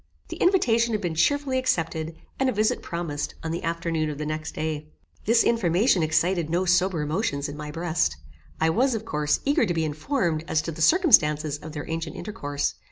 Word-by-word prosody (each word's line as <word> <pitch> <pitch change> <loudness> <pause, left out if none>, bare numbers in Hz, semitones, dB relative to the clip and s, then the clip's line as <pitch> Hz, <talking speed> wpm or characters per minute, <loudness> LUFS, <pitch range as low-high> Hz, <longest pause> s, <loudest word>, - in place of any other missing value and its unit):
The - - -6
invitation 235 - +3
had 210 - -2
been 175 -4 -2
cheerfully 270 - +1
accepted, 165 -9 -1 0.2
and 265 0 +2
a - - -1
visit 215 +4 +1
promised 170 -4 -4
on 160 - -3
the 170 - -3
afternoon 165 -1 -1
of 150 - -5
the 150 - -4
next 155 +1 -4
day. 155 -1 -3 0.4
This 230 +2 +4
information 195 -2 +2
excited 165 +1 +1
no 175 +3 +1
sober 180 -2 +2
emotions 150 -3 -1
in 145 - -7
my 150 0 -7
breast. 160 - -1 0.4
I 160 0 +3
was, 250 +6 +2
of 220 0 -5
course, 150 -6 0
eager 285 +1 +3
to 175 - 0
be 160 -1 +1
informed 160 - -1
as 155 -1 +1
to 165 - -4
the 160 +1 -8
circumstances 155 - +4
of 155 0 -9
their 145 -2 -6
ancient 165 -1 -4
intercourse. 145 -9 -3
165 Hz, 195 wpm, -25 LUFS, 155-215 Hz, 0.4 s, This